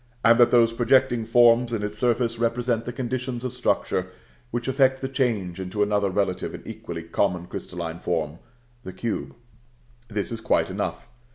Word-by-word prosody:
and 115 +1 +6
that 120 - +7
those 115 -2 +4
projecting 120 0 +3
forms 120 0 +5
in 110 -3 -2
its 105 0 -4
surface 120 -1 +1
represent 115 0 0
the 120 - -3
conditions 125 0 -3
of 130 - -3
structure 95 -6 0 0.4
which 120 0 -3
effect 130 0 +3
the 135 - -3
change 115 -10 -1
into 95 +3 -1
another 105 -1 +1
relative 95 -1 -1
and - - -11
equally 85 -1 -7
common 90 +1 0
crystalline 85 -1 -6
form, 80 -3 -2 0.4
the 95 - -8
cube. 115 +6 -4 0.7
This 105 -2 -3
is 115 -1 -5
quite - - +1
enough. - - -4
115 Hz, 165 wpm, -25 LUFS, 95-120 Hz, 0.7 s, that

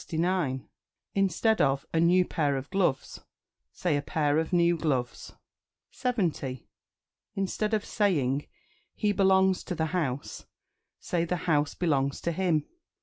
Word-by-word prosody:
Instead 195 +3 +2
of 135 0 +1
"A 165 - +2
new 180 +2 +4
pair 145 -6 0
of 135 +4 -7
gloves," 185 -8 0 0.5
say 175 -5 -1
"A 145 - 0
pair 150 +1 +1
of 160 - -2
new 175 -1 +3
gloves." 135 -7 -2 0.6
70. 170 - -2 0.7
Instead 210 +3 -1
of 210 - -2
saying 145 - 0 0.5
"He 210 -1 +1
belongs 190 -1 +3
to 180 - -4
the 160 -1 0
house," 145 -7 -3 0.5
say 170 -2 -1
"The 170 +1 -1
house 150 -4 +1
belongs 140 -5 0
to 170 - -1
him." 165 -4 +1
170 Hz, 130 wpm, -28 LUFS, 145-190 Hz, 0.7 s, new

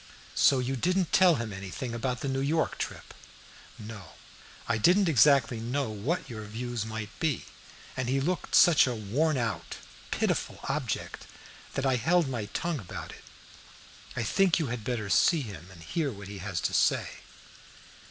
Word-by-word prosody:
"So 135 - +5
you 130 +1 -1
didn't 180 +6 0
tell 180 -3 +6
him 115 -5 -4
anything 95 +6 -5
about 125 +1 -2
the - - -2
New 135 0 -1
York 155 +4 0
trip?" - - -5 0.6
"No, 105 -5 -9 0.5
I 115 -1 +1
didn't 185 - +5
exactly 140 -5 +4
know 120 +1 -2
what 125 - -2
your 110 -4 -7
views 115 +1 -4
might 110 -2 -5
be, 155 -5 0 0.5
and 130 -1 -2
he 135 +1 +2
looked 175 +6 -1
such 165 -6 +7
a 125 - -1
worn 135 +9 0
out, 95 - -3 0.3
pitiful - - -1
object - - -3 0.5
that 135 - -1
I 130 -2 +3
held 170 +5 +2
my 120 -5 -3
tongue 155 +9 -2
about 95 -6 -7
it. - - -13 0.9
I 120 - -1
think 185 - +3
you 155 -7 -1
had 120 -3 -5
better 115 -3 -2
see 160 - +4
him 95 - -9
and 85 -3 -13
hear 150 - -1
what 100 -3 -9
he 100 -1 -7
has 95 -2 -3
to - - -1
say." - - +3
125 Hz, 170 wpm, -29 LUFS, 110-150 Hz, 0.9 s, such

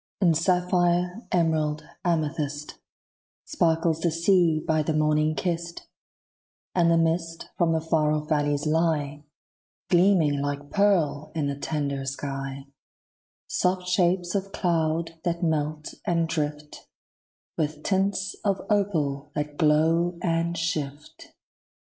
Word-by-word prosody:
In 175 -4 +4
sapphire, 180 +2 +1
emerald, 155 -3 +1 0.2
amethyst, 150 -3 -2 0.7
Sparkles 165 -1 +1
the 170 - +1
sea 165 -1 +3
by 155 0 0
the 155 +1 -1
morning 155 0 +2
kissed; 170 -1 -3 0.9
And 170 -2 +3
the 165 - +4
mist 165 0 -1
from 170 -2 +2
the 160 -1 +1
far 155 -2 +1
off 150 0 -1
valleys 145 -1 0
lie 155 -2 0 0.7
Gleaming 175 -6 +4
like 145 0 -4
pearl 165 -7 +2
in 155 -3 0
the 140 0 -1
tender 140 -1 -2
sky; 135 0 -5 0.8
Soft 180 0 0
shapes 180 -1 +1
of 195 0 -2
cloud 165 -2 -1
that 170 0 -1
melt 155 -1 -1
and 170 -1 +1
drift, 150 -2 -4 0.7
With 150 -1 -2
tints 195 0 0
of 200 -2 +1
opal 150 -9 0
that 150 0 -3
glow 165 +3 +2
and 170 0 0
shift. 150 -3 -4
160 Hz, 115 wpm, -26 LUFS, 150-175 Hz, 0.9 s, In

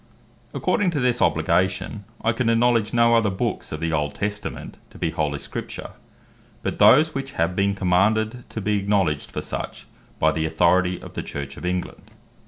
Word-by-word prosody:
According 205 -3 +1
to 150 - -1
this 125 -1 +1
obligation, 95 +5 +1 0.2
I 115 - +3
can 115 0 0
acknowledge 115 -1 +3
no 115 0 +4
other 115 -3 +4
Books 95 - -3
of 75 - -4
the 80 0 -1
Old 75 -1 -1
Testament, 105 0 -4
to - - -15
be - - -1
Holy 75 -2 -1
Scripture, - - -6 0.7
but - - -3
those 155 +4 +6
which 135 0 -4
have 85 +2 0
been 100 +1 +1
commanded 110 +6 +1
to 110 - -5
be 105 +1 +1
acknowledged 95 -7 0
for - - -5
such, - - -5 0.3
by 80 - +3
the 80 0 -1
Authority 90 +2 +2
of - - -11
the - - -3
Church 70 -1 -6
of 90 - -5
England. 90 0 -4
100 Hz, 180 wpm, -23 LUFS, 85-115 Hz, 0.7 s, those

